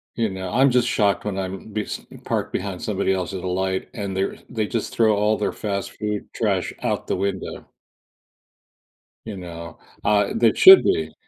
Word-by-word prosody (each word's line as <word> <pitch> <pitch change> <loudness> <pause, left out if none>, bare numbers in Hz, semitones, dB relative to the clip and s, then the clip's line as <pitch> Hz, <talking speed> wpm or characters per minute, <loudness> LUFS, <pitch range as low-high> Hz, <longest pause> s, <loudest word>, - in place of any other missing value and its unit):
You 115 -3 0
know, 95 -1 -5
I'm 130 +1 +4
just 120 -1 +3
shocked 105 -3 +1
when 100 -2 -3
I'm 95 +3 -5
bes 105 -1 -4 0.2
parked - - -2
behind - - -4
somebody 95 - 0
else's 95 0 -3
light, 95 +1 -2
and 100 -5 -4
they're 95 - -1
they 110 -3 -1
just 115 - -3
throw 110 -2 +3
all 105 +1 +2
their 105 - -1
fast 100 -2 -3
food 105 -1 -4
trash - - -1
out - - -2
the - - 0
window. 95 0 -4 1.6
You 105 -3 -6
know, 85 -2 -8 0.3
uh, 105 -1 +2
that 115 -1 +3
should 380 0 +10
be. 390 +1 0
100 Hz, 170 wpm, -22 LUFS, 95-110 Hz, 1.6 s, should